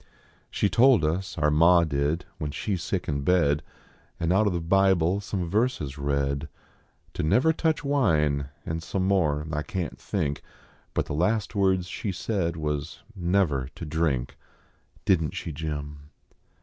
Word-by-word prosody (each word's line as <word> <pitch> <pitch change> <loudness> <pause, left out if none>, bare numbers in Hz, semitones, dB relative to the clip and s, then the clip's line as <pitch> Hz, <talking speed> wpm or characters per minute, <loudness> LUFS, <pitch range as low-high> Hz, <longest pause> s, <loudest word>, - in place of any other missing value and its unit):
She - - +1
told 120 -5 +5
us, 85 +5 -2
our 75 -1 +2
ma 85 +3 +6
did, 75 +2 -1
when 75 - -2
she 100 +7 -3
s 90 - -2
sick - - -2
in 70 0 -1
bed, 75 -2 +2 0.6
An 85 +1 0
out 100 +3 +4
of 100 - +1
the 85 - 0
Bible 95 +1 +3
some 95 -3 -3
verses 85 - -1
read, 70 +1 -1 0.6
To - - -2
never 125 - +3
touch 160 -1 0
wine, 75 - +1 0.2
and 80 +1 -3
some 95 +3 -2
more 75 -7 +1
I 75 0 -1
can 80 +1 -3
t - - -13
think; 70 0 -2 0.5
Hut - - +1
the - - -5
last 105 +8 0
words 95 -3 +2
she 100 +3 -4
said 90 -3 -2
was 75 -2 -3
never 85 -8 +1
to 85 - -7
drink 75 -5 -1 0.7
Didn 80 -5 +3
t - - -11
she, 85 - -4
Jim 75 -1 -6
85 Hz, 160 wpm, -26 LUFS, 75-95 Hz, 0.7 s, ma